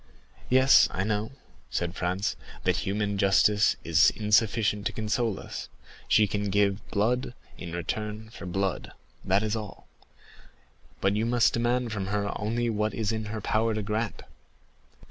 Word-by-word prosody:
"Yes, 130 Hz, +1 st, +6 dB
I 95 Hz, -, -2 dB
know," 110 Hz, +1 st, -1 dB, 0.4 s
said 85 Hz, +5 st, -2 dB
Franz, 90 Hz, +1 st, -1 dB, 0.3 s
"that 90 Hz, -1 st, +2 dB
human 100 Hz, +1 st, -2 dB
justice 105 Hz, +2 st, +4 dB
is -, -, +5 dB
insufficient 105 Hz, -1 st, +2 dB
to -, -, -3 dB
console 110 Hz, 0 st, -1 dB
us; -, -, -7 dB, 0.4 s
she 110 Hz, -, +5 dB
can 105 Hz, 0 st, -2 dB
give 100 Hz, +1 st, +1 dB
blood 120 Hz, +4 st, 0 dB, 0.2 s
in 85 Hz, -, -8 dB
return 105 Hz, +5 st, -4 dB
for 95 Hz, -, -9 dB
blood, 95 Hz, +1 st, -2 dB, 0.3 s
that 95 Hz, +3 st, +2 dB
is 110 Hz, 0 st, -1 dB
all; 105 Hz, -2 st, -7 dB, 1.1 s
but 95 Hz, +1 st, +2 dB
you 110 Hz, +2 st, 0 dB
must 120 Hz, -1 st, +3 dB
demand 120 Hz, 0 st, 0 dB
from 100 Hz, -3 st, -3 dB
her 100 Hz, 0 st, -2 dB
only 115 Hz, +3 st, -1 dB
what 105 Hz, -2 st, -1 dB
it -, -, -9 dB
is 110 Hz, -2 st, 0 dB
in 110 Hz, -1 st, -3 dB
her 105 Hz, +1 st, -5 dB
power 110 Hz, +2 st, +1 dB
to 110 Hz, -, -2 dB
grant." 105 Hz, +2 st, -3 dB
105 Hz, 155 wpm, -27 LUFS, 100-110 Hz, 1.1 s, Yes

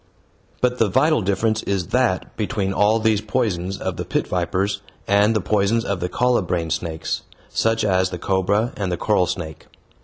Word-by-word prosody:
But 125 Hz, 0 st, +1 dB
the 110 Hz, -, +3 dB
vital 150 Hz, +6 st, +3 dB
difference 110 Hz, +3 st, +1 dB
is 95 Hz, -3 st, -2 dB
that 125 Hz, -8 st, 0 dB
between 105 Hz, -3 st, -1 dB
all 105 Hz, +3 st, +3 dB
these 110 Hz, -2 st, +2 dB
poisons 100 Hz, -5 st, -1 dB
of -, -, -4 dB
the -, -, -2 dB
pit -, -, -1 dB
vipers 95 Hz, +3 st, -1 dB, 0.3 s
and 105 Hz, +3 st, +4 dB
the 105 Hz, -, +2 dB
poisons 105 Hz, +4 st, +1 dB
of 100 Hz, -2 st, -1 dB
the 90 Hz, 0 st, -2 dB
colubrine 90 Hz, -7 st, 0 dB
snakes, 80 Hz, -1 st, -2 dB, 0.3 s
such 115 Hz, 0 st, +1 dB
as 95 Hz, -2 st, +2 dB
the 90 Hz, -, -5 dB
cobra 95 Hz, +6 st, +1 dB
and 95 Hz, -3 st, -2 dB
the 90 Hz, -, -1 dB
coral 95 Hz, -1 st, +2 dB
snake. 80 Hz, -3 st, -5 dB
100 Hz, 175 wpm, -22 LUFS, 90-110 Hz, 0.3 s, and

